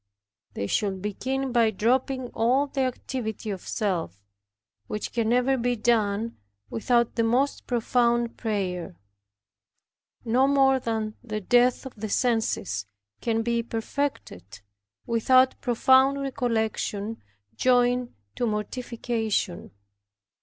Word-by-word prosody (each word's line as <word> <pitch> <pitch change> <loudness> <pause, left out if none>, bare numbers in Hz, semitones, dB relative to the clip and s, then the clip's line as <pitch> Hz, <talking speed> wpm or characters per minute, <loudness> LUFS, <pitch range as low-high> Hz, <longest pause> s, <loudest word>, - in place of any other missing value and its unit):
They 100 - -2
should 195 - -1
begin 260 +6 -2
by 235 -2 +4
dropping 250 +4 0
all 250 +5 +2
the 275 -1 -3
activity 245 -4 -3
of 190 -2 -5
self, 170 - -2 0.6
which 210 - -4
can 225 -2 0
never 250 +3 +3
be 245 +1 +1
done 220 -1 0 0.3
without 235 +1 +1
the 230 - +1
most 250 +5 +1
profound 240 -1 +1
prayer; 185 - -3 1.3
no 250 +4 +3
more 270 -1 +4
than 220 -2 -3
the 215 -3 -4
death 245 +6 +3
of 265 - -7
the 215 0 -6
senses 200 - 0 0.3
can 225 -1 0
be 235 0 +1
perfected 225 - -4 0.4
without 255 +3 +3
profound 260 +3 +4
recollection 225 -5 -2 0.3
joined 245 - +2 0.2
to 240 - 0
mortification. 220 -2 -2
235 Hz, 110 wpm, -26 LUFS, 215-250 Hz, 1.3 s, by